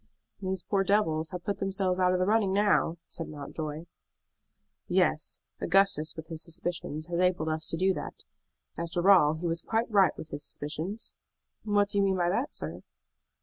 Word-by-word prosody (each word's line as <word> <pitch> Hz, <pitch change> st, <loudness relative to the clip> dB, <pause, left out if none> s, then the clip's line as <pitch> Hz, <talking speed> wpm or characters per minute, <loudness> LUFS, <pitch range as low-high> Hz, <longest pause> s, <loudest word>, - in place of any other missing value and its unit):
"These 190 Hz, -1 st, -2 dB
poor 195 Hz, -1 st, +1 dB
devils 165 Hz, -6 st, +2 dB
have 180 Hz, -1 st, -6 dB
put 200 Hz, -, -2 dB
themselves 195 Hz, -1 st, 0 dB
out 180 Hz, 0 st, +4 dB
of 185 Hz, -, +2 dB
the 185 Hz, -, +1 dB
running 210 Hz, -1 st, +3 dB
now," 200 Hz, -4 st, +2 dB
said 165 Hz, -, -5 dB
Mountjoy. 155 Hz, +2 st, -6 dB, 1.0 s
"Yes; -, -, +1 dB, 0.2 s
Augustus 185 Hz, -4 st, +3 dB
with 160 Hz, -, -7 dB
his 160 Hz, -1 st, -6 dB
suspicions 165 Hz, -2 st, -4 dB
has 170 Hz, 0 st, -2 dB
enabled 180 Hz, -3 st, +2 dB
us 155 Hz, 0 st, -1 dB
to 165 Hz, -, -1 dB
do 190 Hz, +2 st, +3 dB
that. -, -, -7 dB, 0.6 s
After 170 Hz, +3 st, +3 dB
all, 155 Hz, -5 st, +6 dB
he 165 Hz, +3 st, -6 dB
was 165 Hz, 0 st, +1 dB
quite 225 Hz, +4 st, -1 dB
right 195 Hz, -6 st, +4 dB
with 160 Hz, -, -8 dB
his 145 Hz, 0 st, -5 dB
suspicions." 160 Hz, +11 st, -4 dB, 0.5 s
"What 205 Hz, -1 st, +2 dB
do 205 Hz, -, +1 dB
you -, -, +4 dB
mean 190 Hz, -1 st, +2 dB
by 175 Hz, -1 st, +2 dB
that, 235 Hz, +10 st, -1 dB
sir?" -, -, -4 dB
180 Hz, 180 wpm, -29 LUFS, 160-195 Hz, 1.0 s, all